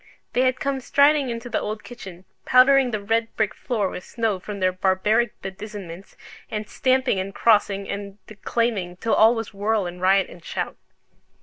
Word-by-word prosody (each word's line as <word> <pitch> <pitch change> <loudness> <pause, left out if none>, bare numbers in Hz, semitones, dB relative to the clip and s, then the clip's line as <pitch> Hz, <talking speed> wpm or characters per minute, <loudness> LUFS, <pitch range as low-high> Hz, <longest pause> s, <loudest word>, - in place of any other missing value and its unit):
They 250 - +2
had 255 0 +2
come 275 -1 -1
striding 280 +1 +3
into 235 +1 -5
the - - -1
old 215 0 -5
kitchen, 190 -7 -11 0.2
powdering 260 +1 +5
the 215 -3 -3
red 225 +2 +1
brick 215 -2 0
floor 220 -6 -2
with 180 - -7
snow 225 -5 -2
from 200 +2 -7
their 185 -1 +2
barbaric 195 +5 +1
bedizenments; 195 -2 -8 0.3
and 215 -1 -4
stamping, 260 -5 +1
and 195 +1 -5
crossing, 200 -3 +2
and 200 0 -6
declaiming, 215 -4 -2
till 225 +5 -1
all 225 +2 +5
was 225 -1 -5
whirl 205 0 0
and 175 0 -7
riot 190 +1 +3
and 175 - -14
shout. - - -4
215 Hz, 175 wpm, -23 LUFS, 195-235 Hz, 0.3 s, powdering